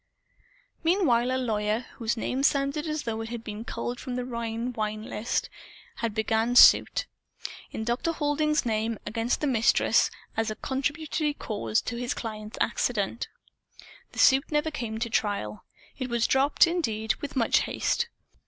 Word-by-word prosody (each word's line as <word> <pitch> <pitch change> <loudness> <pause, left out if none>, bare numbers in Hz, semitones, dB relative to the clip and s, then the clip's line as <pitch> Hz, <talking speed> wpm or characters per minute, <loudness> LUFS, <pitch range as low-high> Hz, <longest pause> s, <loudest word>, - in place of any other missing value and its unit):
Meanwhile, 310 -9 +3
a 260 - +1
lawyer, 215 -3 0 0.2
whose 230 0 -1
name 255 +4 -1
sounded 280 +2 +1
as 305 -1 -2
though 225 -1 -3
it 225 - -5
had 235 -1 -5
been 215 -1 -6
culled 240 +1 -4
from 250 -1 -4
a 250 - -2
Rhine 235 0 -3
Wine 215 -1 -3
list, 225 +1 -2 0.5
had 230 -2 -2
begun 225 +2 +1
suit, - - +7 0.6
in 220 - -5
Dr. 240 +8 0
Halding's 300 -1 +1
name, 225 0 0
against 230 +2 -1
the - - +1
Mistress, 240 -5 +3 0.3
as 225 0 0
a 215 - -3
"contributory 295 +4 -2
cause" 115 - -1
of 240 -1 -3
his 245 +2 -2
client's 215 -2 -6
accident. 230 -1 0 0.9
The - - -13
suit 270 +2 +5
never 300 +1 +1
came 235 -7 -4
to 235 +1 -2
trial. 200 - -1 0.3
It 255 -1 -3
was 235 -1 +1
dropped, 275 +5 +4
indeed, 220 - 0
with 290 - -7
much 235 -3 +3
haste. 475 - 0
235 Hz, 155 wpm, -27 LUFS, 220-275 Hz, 0.9 s, suit